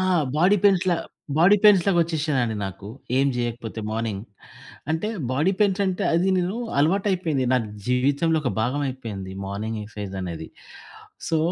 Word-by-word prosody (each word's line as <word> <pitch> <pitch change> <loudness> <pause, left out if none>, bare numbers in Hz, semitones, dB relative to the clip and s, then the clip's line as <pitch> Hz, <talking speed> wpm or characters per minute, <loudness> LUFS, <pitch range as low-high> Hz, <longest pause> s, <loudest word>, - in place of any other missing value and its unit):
ఆ! - - +1 0.3
Body 185 +6 +4
పెయిన్స్‌లా 185 -3 +4 0.4
body 195 +5 +6
పెయిన్స్‌లాగా 195 -3 +6
వచ్చేసినాయండి 150 -9 -1
నాకు. 95 +1 -8 0.3
ఏం 135 +1 +3
జెయ్యకపోతే 120 -2 -4
మార్నింగ్ 110 -3 -3 0.7
అంటే 160 +6 -1 0.2
బాడీ 150 +9 +2
పెయిన్స్ 200 -1 +3
అంటే 185 -1 -1
అది 175 +3 +2
నేను 180 +4 -1 0.2
అలవాటయిపోయింది. 175 -3 +1
నాకు 115 -4 0 0.2
జీవితంలో 140 +6 +2
ఒక 125 - 0
భాగమైపోయింది 120 -6 -3
మార్నింగ్ 110 +3 -4
ఎక్సైజనేది. 95 -6 -6 0.8
సో 165 - +2
140 Hz, 125 wpm, -24 LUFS, 110-175 Hz, 0.8 s, బాడీ